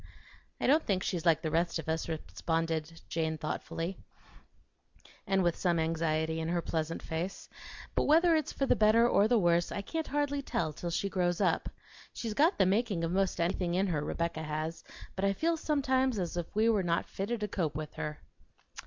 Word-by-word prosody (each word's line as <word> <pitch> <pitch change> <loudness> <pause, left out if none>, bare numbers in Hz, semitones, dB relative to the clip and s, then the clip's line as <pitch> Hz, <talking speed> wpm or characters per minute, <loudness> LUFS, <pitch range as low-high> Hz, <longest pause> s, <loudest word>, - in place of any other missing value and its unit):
"I - - -1
don't 300 +4 +4
think 190 -2 0
she's 175 -2 -2
like 165 0 +4
the 155 - -1
rest 170 +2 +1
of 160 - -6
us," 160 +1 -1
responded 165 0 -2
Jane 160 -1 -1
thoughtfully 165 +3 -4 1.3
and 195 -1 +2
with 175 -1 +2
some 175 -2 +1
anxiety 160 0 0
in 160 - -2
her 175 0 +1
pleasant 160 0 -2
face; 170 +4 -4 0.5
"but - - +1
whether 330 +3 +5
it's 310 -1 0
for 275 - -1
the - - +3
better 220 +2 +5
or 210 -3 +4
the 240 +1 +4
worse 175 -3 +2
I 200 - -3
can't 320 +8 -3
hardly 285 0 0
tell 160 - -2
till 175 - -5
she 175 +4 -1
grows 180 -2 0
up. - - +1 0.4
She's 225 -2 -4
got 310 - +3
the 190 - +4
making 200 -2 +1
of 165 - -1
'most 195 +1 +1
anything 175 0 0
in 190 +2 +2
her, 155 -6 -1
Rebecca 170 0 -2
has; 155 +1 -4 0.3
but 190 - -3
I 195 0 +3
feel 330 +10 +1
sometimes 265 -5 +1
as 175 -3 -2
if 175 +3 -5
we 220 +2 +3
were 220 -3 +3
not 170 -2 0
fitted 215 +4 -3
to 210 - 0
cope 165 -7 -2
with 155 0 -5
her." 150 -1 -4
175 Hz, 195 wpm, -31 LUFS, 165-215 Hz, 1.3 s, whether